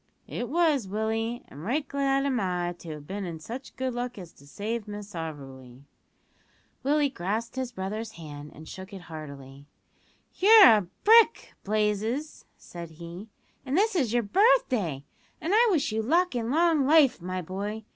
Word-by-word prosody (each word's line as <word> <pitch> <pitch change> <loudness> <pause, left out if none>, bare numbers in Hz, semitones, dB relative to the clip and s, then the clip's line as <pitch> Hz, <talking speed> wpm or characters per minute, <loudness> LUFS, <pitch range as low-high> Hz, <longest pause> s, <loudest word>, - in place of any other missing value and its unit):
"It 240 - -4
was, 305 - +2
Willie, 225 +4 -2
and 145 +3 -11
right 275 - -1
glad 275 0 0
am 265 -4 0
I 180 -3 -1
to 170 - -10
have 150 -1 -10
been 200 +5 -5
in 170 -3 -6
such 240 - -8
good 260 -1 -2
luck 245 0 -4
as 175 -4 -9
to 140 - -19
save 215 +7 -4
Miss 205 0 -8
Auberly." 135 -6 -8 1.0
Willie 290 0 +2
grasped 220 +3 -3
his 260 -2 -3
brother's 215 +2 -5
hand 150 -4 -9
and 155 +1 -12
shook 190 +1 -9
it 190 - -8
heartily. 140 -4 -10 0.7
"You're 430 +2 +9
a 210 -6 +5 0.2
brick, 455 +1 +5
Blazes," 215 +7 -1
said 170 -1 -9
he, 170 +5 -9 0.3
"and 275 +3 -1
this 430 +1 +2
is 260 -11 +1
your 240 0 +2
birthday, 225 - +2 0.4
an' 340 +5 -2
I 470 +3 +5
wish 310 - +1
you 220 +1 0
luck 335 +6 +2
an' 230 -1 -2
long 315 -1 +3
life, 295 - +5
my 185 +1 -4
boy. 205 +5 -5
220 Hz, 165 wpm, -27 LUFS, 175-275 Hz, 1.0 s, You're